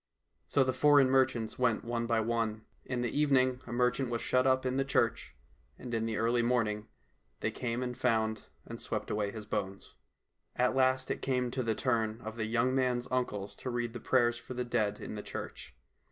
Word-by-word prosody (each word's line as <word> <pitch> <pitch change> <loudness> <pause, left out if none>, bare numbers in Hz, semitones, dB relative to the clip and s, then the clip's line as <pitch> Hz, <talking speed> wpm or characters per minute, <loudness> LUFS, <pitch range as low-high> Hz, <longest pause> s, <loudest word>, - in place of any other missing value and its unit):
So 140 - +3
the 130 0 0
foreign 140 0 +5
merchants 130 -4 +1
went 120 -3 +1
one 120 0 -2
by 115 -1 +2
one. 110 -1 -1 0.2
In 125 -1 -2
the 120 - -2
evening 130 -3 +3
a - - -7
merchant 125 +1 +1
was 120 -1 -1
shut 130 +1 +2
up 130 0 +2
in 130 +1 0
the 135 - +2
church, 135 - 0 0.4
and 120 - -7
in 115 0 0
the 110 -2 -2
early 120 +2 +2
morning 115 -3 0 0.5
they 110 - 0
came 120 +1 -2
and 125 -1 -3
found 110 -3 0 0.2
and - - -8
swept - - -3
away 105 -1 0
his 110 0 -7
bones. 100 -2 -4 0.6
At 125 +1 +2
last 130 0 +2
it - - -3
came 125 -2 0
to 130 - -1
the 115 -3 0
turn 115 -3 0
of 110 -1 -6
the 110 -1 -2
young 120 +3 +1
man's 125 -2 +1
uncles 105 -6 -2
to 130 - -5
read 120 -1 -2
the 120 - -5
prayers 120 -1 +2
for 130 - -8
the 125 0 -2
dead 115 -4 0
in - - -6
the - - -5
church. - - -7
120 Hz, 205 wpm, -31 LUFS, 110-130 Hz, 0.6 s, foreign